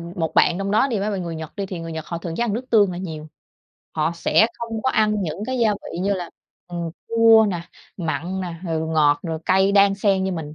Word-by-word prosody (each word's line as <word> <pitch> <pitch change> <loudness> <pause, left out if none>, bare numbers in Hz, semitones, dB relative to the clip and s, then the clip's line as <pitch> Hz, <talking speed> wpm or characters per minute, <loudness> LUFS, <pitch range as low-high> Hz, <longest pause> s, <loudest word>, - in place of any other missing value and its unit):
một 160 -4 -2
bạn 175 - +4
trong 195 0 -2
đó 240 +6 +3
đi 225 -6 -1
mấy 210 +2 -1
bạn 190 -3 -3
người 165 -1 -5
Nhật 160 -1 -8
đi, 200 - -3
thì 185 -3 -6
người 165 0 -6
Nhật 160 -1 -5 0.2
thường 165 -2 -5
ăn 235 -4 0
nước 240 +4 -3
tương 205 -4 +4
là 175 - -5
nhiều. 160 -4 -6 0.7
Họ 155 +2 0
sẽ 215 +6 +3
không 225 -2 -4
có 260 - +2
ăn 215 -3 +2
những 175 +4 -4
gia 240 -4 +1
vị 195 -3 -7
như 200 +2 0
là, 175 -3 -5 0.4
ừm, 170 -1 -4 0.2
chua 225 -1 +6
nè, 175 -3 -3 0.4
mặn 175 +2 -3
nè, 175 -2 -4
rồi 160 -2 -2
ngọt, 150 -2 +3
rồi 165 -2 -3
cay 190 +1 +3
đan 200 -1 +5
xen 195 -1 +1
như 190 - -1
mình. 155 -3 -6
185 Hz, 240 wpm, -22 LUFS, 165-210 Hz, 0.7 s, chua